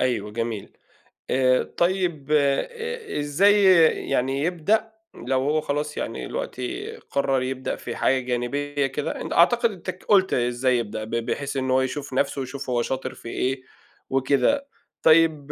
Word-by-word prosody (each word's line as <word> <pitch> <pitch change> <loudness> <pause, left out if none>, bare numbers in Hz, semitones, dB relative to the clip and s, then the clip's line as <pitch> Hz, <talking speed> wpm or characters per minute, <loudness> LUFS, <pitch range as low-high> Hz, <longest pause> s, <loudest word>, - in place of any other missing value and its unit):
أيوه 110 -5 0
جميل، 115 -2 -4 0.6
آآ، 130 0 +3
طيب 175 -5 0
إ 455 - 0
إزاي 200 +8 +4 0.5
يعني 135 +1 0
يبدأ 200 +7 +1 0.2
لو 130 +2 -1
هو 150 +3 +1
خلاص 150 0 -3
يعني - - -4
دلوقتي 410 -4 -4
قرر 135 - -1
يبدأ 130 0 -3
في - - -7
حاجة 130 - +2
جانبية 140 +3 -1
كده، 140 +2 -4
أن - - -6
أعتقد 235 +7 +4
أنت 185 -2 -8
ك 185 0 -6
قُلت 190 -2 +3
إزاي 125 +1 +1
يبدأ 110 -2 -4
ب 110 - -8
بحيث 135 +5 -2
إن 130 -1 -1
هو 130 0 +4
يشوف 140 +1 -4
نَفْسه 140 +1 0
ويشوف 135 +1 -6
هو 120 -1 +1
شاطر 130 +2 -3
في 115 - -10
إيه 130 +2 -1 0.5
وكده، 140 - +2 0.4
طيب 155 -3 +4
140 Hz, 150 wpm, -24 LUFS, 130-175 Hz, 0.6 s, إزاي